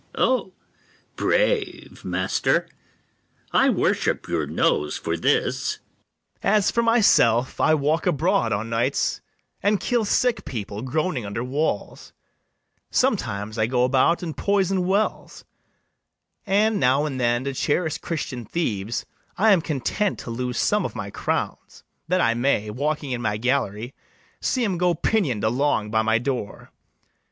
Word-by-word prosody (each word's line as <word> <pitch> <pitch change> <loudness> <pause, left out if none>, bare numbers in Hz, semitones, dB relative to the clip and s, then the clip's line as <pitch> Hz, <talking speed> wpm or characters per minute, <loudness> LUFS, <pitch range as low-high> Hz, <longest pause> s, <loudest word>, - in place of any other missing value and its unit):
ITHAMORE. - - +3
O, 240 -7 -1 0.6
brave, 435 -8 0
master! - - 0 0.8
I - - +4
worship - - 0
your - - -1
nose - - +1
for - - -2
this. - - 0
BARABAS. - - -36 0.5
As 205 0 +3
for 235 - +1
myself, 200 - +3
I 155 - +4
walk 155 +5 0
abroad 135 -7 +1
o' 100 0 0
nights, 115 +1 -1 0.4
And 205 0 +2
kill 240 -3 0
sick 245 +4 +1
people 105 -3 -5
groaning 150 +1 -1
under 100 +4 -4
walls: 135 -3 -3 0.8
Sometimes 105 +2 -1
I 110 - +2
go 125 0 +1
about 135 +7 +2
and 160 -3 -4
poison 195 -2 +1
wells; 200 +3 -1 1.0
And 210 +2 +2
now 135 +3 +3
and 135 -4 -3
then, 120 0 +1
to 140 0 -3
cherish 160 +3 0
Christian 145 -8 -4
thieves, 110 - -2 0.3
I 215 +4 +5
am 190 -4 +5
content 160 - -1
to 115 - -7
lose 125 +1 -3
some - - +2
of - - -4
my - - -5
crowns, - - -4 0.2
That 180 +2 +2
I 115 - +3
may, 115 -3 0
walking 145 +3 -2
in 120 -1 -2
my 105 -2 -1
gallery, 120 -1 -1 0.5
See 255 -3 0
'em 185 -5 -1
go 180 -1 +2
pinion'd 150 - 0
along 110 -2 +1
by 110 0 +3
my 110 +1 +2
door. 120 -3 -4
140 Hz, 145 wpm, -23 LUFS, 115-185 Hz, 1.0 s, I